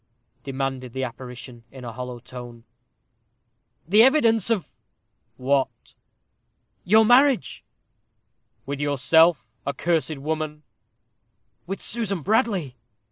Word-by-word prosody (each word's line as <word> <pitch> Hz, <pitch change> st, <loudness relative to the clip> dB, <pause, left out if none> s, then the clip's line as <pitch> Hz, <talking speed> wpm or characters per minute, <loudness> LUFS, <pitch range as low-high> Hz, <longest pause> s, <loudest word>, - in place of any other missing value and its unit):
demanded 135 Hz, -2 st, -4 dB
the 130 Hz, -, -3 dB
apparition, 125 Hz, -1 st, -8 dB
in 130 Hz, -2 st, -10 dB
a 120 Hz, -, -5 dB
hollow 125 Hz, +1 st, -6 dB
tone. 120 Hz, -1 st, -11 dB, 1.2 s
"The 210 Hz, +5 st, +6 dB
evidence 230 Hz, -5 st, +4 dB
of 220 Hz, -7 st, -1 dB, 0.3 s
" -, -, -48 dB
"What?" 130 Hz, -4 st, 0 dB, 0.9 s
"Your 220 Hz, +4 st, +5 dB
marriage." 255 Hz, +2 st, +3 dB, 1.0 s
"With 140 Hz, 0 st, -4 dB
yourself, 145 Hz, +1 st, +3 dB, 0.2 s
accursed 155 Hz, +2 st, -1 dB
woman?" 155 Hz, +1 st, -4 dB, 1.0 s
"With 195 Hz, +2 st, -5 dB
Susan 200 Hz, -7 st, -3 dB
Bradley." 195 Hz, -, 0 dB
145 Hz, 95 wpm, -24 LUFS, 130-195 Hz, 1.2 s, The